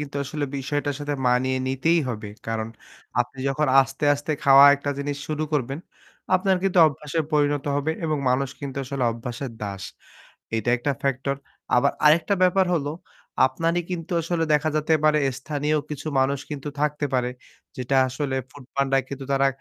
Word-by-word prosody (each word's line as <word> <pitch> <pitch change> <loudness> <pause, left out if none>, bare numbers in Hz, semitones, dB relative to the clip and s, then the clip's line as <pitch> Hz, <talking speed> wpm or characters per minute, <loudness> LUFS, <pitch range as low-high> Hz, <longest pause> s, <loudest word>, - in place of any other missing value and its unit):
কিন্তু 145 -1 -5
আসলে 150 +2 -3
বিষয়টার 145 +1 -2
সাথে 145 0 -2
মানিয়ে 130 +1 +2
নিতেই 160 +6 +2
হবে। 110 -3 -5 0.2
কারণ 110 0 -2 0.5
আপনি 125 +2 -3
যখন 150 +2 0
আস্তে, 135 +2 -2
আস্তে 145 +2 -3
খাওয়া 140 0 +9
একটা 145 0 -3
জিনিস 145 0 -3
শুরু 155 0 -1
করবেন, 135 0 -1 0.6
আপনার 190 0 +3
কিন্তু 190 -2 +1
অভ্যাসে 150 +1 -2
পরিণত 145 -1 +2
হবে 150 +3 0
এবং 155 -2 0
মানুষ 130 +1 +1
কিন্তু 140 -1 -6
আসলে 130 -1 -2
অভ্যাসের 120 +2 -6
দাস। 100 -2 -5 0.7
এইটা 115 +1 -1
একটা 135 +4 -1
ফ্যাক্টর। 140 0 -1 0.4
আবার 135 +3 +4
আরেকটা 160 +5 +5
ব্যাপার 185 +1 +4
হল 145 -4 0 0.6
আপনারই 165 +6 0
কিন্তু 170 -2 -5
আসলে 165 0 -1
দেখা 150 +1 +2
যেতে 155 +1 +2
পারে 150 0 +4 0.2
স্থানীয় 150 +1 -1
কিছু 150 +1 -5
মানুষ 135 +1 +1
কিন্তু 145 0 -5
থাকতে 150 0 0
পারে। 125 -1 +1 0.5
যেটা 130 +2 -1
আসলে 130 +1 -3 0.2
ফুড 145 -3 -13
পান্ডা 135 -1 +2
কিন্তু 135 -1 -6
তারা 135 0 +3
140 Hz, 160 wpm, -24 LUFS, 130-150 Hz, 0.7 s, খাওয়া